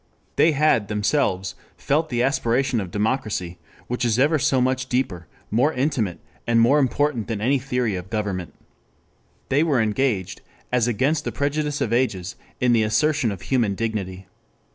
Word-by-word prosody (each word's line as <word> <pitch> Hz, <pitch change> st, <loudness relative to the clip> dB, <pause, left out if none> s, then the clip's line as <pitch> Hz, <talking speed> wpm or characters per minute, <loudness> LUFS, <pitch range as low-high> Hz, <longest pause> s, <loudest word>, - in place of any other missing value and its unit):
They 160 Hz, -, +4 dB
had 145 Hz, -8 st, +2 dB
themselves 105 Hz, -3 st, 0 dB, 0.2 s
felt 155 Hz, +3 st, 0 dB
the 120 Hz, -1 st, 0 dB
aspiration 130 Hz, -2 st, +1 dB
of 95 Hz, -, -6 dB
democracy, 105 Hz, -5 st, -2 dB, 0.3 s
which 125 Hz, +1 st, -3 dB
is 115 Hz, -2 st, +2 dB
ever 150 Hz, +4 st, +3 dB
so 135 Hz, -1 st, +2 dB
much 130 Hz, +1 st, 0 dB
deeper, 95 Hz, -10 st, -1 dB, 0.2 s
more 125 Hz, +8 st, +3 dB
intimate 125 Hz, -, -1 dB, 0.3 s
and 115 Hz, 0 st, +3 dB
more 130 Hz, +6 st, +5 dB
important 135 Hz, -3 st, 0 dB
than 115 Hz, -3 st, -3 dB
any 130 Hz, +6 st, +2 dB
theory 125 Hz, -5 st, -1 dB
of 90 Hz, +1 st, -6 dB
government. 100 Hz, -5 st, -3 dB, 0.9 s
They 140 Hz, +3 st, +3 dB
were 150 Hz, -6 st, +2 dB
engaged, 110 Hz, -3 st, 0 dB, 0.3 s
as 125 Hz, -2 st, +2 dB
against 140 Hz, +7 st, +1 dB
the -, -, -3 dB
prejudice 145 Hz, +1 st, -1 dB
of 115 Hz, -, 0 dB
ages, 100 Hz, -7 st, 0 dB, 0.2 s
in 125 Hz, -2 st, +3 dB
the 115 Hz, -, +4 dB
assertion 135 Hz, +3 st, +1 dB
of 95 Hz, -2 st, -7 dB
human 115 Hz, -7 st, +1 dB
dignity. 95 Hz, -4 st, -3 dB
120 Hz, 160 wpm, -23 LUFS, 105-135 Hz, 0.9 s, more